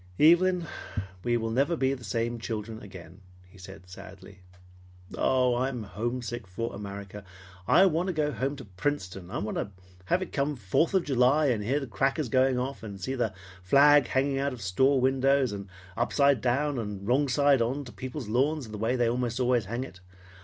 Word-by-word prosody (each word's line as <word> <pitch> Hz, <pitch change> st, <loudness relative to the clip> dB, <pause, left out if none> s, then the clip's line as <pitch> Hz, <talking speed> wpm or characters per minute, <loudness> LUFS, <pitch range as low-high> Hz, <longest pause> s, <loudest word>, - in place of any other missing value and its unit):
"Evelyn, 175 Hz, +2 st, +5 dB, 0.6 s
we 120 Hz, 0 st, +1 dB
will 115 Hz, -1 st, -2 dB
never 140 Hz, +8 st, +1 dB
be 135 Hz, -1 st, +1 dB
the 125 Hz, -3 st, -8 dB
same 115 Hz, +2 st, -2 dB
children 110 Hz, -1 st, -5 dB
again," 95 Hz, -2 st, -12 dB, 0.3 s
he 95 Hz, +2 st, -18 dB
said 90 Hz, -1 st, -12 dB
sadly. 95 Hz, +1 st, -12 dB, 0.8 s
"Oh, 125 Hz, -1 st, +2 dB
I'm 125 Hz, -1 st, -1 dB
homesick 120 Hz, +3 st, -4 dB
for 115 Hz, +6 st, -4 dB
America! 100 Hz, 0 st, -8 dB, 0.4 s
I 190 Hz, -, +6 dB
want 175 Hz, 0 st, +1 dB
to 185 Hz, -, -1 dB
go 150 Hz, -2 st, 0 dB
home 135 Hz, +1 st, -2 dB
to 135 Hz, -3 st, -10 dB
Princeton. 95 Hz, -3 st, -4 dB
I -, -, -4 dB
want 105 Hz, -, -3 dB
to -, -, -2 dB, 0.4 s
have 180 Hz, -, +1 dB
it -, -, -10 dB
come 145 Hz, +1 st, 0 dB
Fourth 125 Hz, -, 0 dB
of 185 Hz, -, +3 dB
July 135 Hz, +2 st, +3 dB
and 110 Hz, -4 st, 0 dB
hear 135 Hz, +7 st, 0 dB
the 140 Hz, -, -5 dB
crackers 135 Hz, +3 st, -1 dB
go 130 Hz, +2 st, +3 dB
off 135 Hz, +2 st, -5 dB
and 100 Hz, -3 st, -8 dB
see 130 Hz, +9 st, -3 dB
the 120 Hz, -7 st, -1 dB, 0.3 s
flag 140 Hz, +7 st, +5 dB
hanging 135 Hz, +1 st, 0 dB
out 140 Hz, 0 st, -1 dB
of 120 Hz, -, -9 dB
store 130 Hz, +9 st, +3 dB
windows, 135 Hz, 0 st, +2 dB
and 100 Hz, -1 st, -6 dB, 0.3 s
upside 140 Hz, +2 st, +2 dB
down 135 Hz, +3 st, 0 dB
and 105 Hz, -3 st, -5 dB
wrong 135 Hz, +4 st, +3 dB
side 140 Hz, 0 st, +3 dB
to 115 Hz, -, +2 dB
on 135 Hz, +4 st, -3 dB
people's 130 Hz, +1 st, -7 dB
lawns 135 Hz, +4 st, 0 dB
the 105 Hz, -1 st, -7 dB
way 115 Hz, +4 st, 0 dB
they 120 Hz, -2 st, +2 dB
most 120 Hz, 0 st, -1 dB
always 125 Hz, -3 st, +2 dB
hang 120 Hz, +5 st, -3 dB
it. 95 Hz, -9 st, -11 dB
125 Hz, 190 wpm, -28 LUFS, 105-140 Hz, 0.8 s, I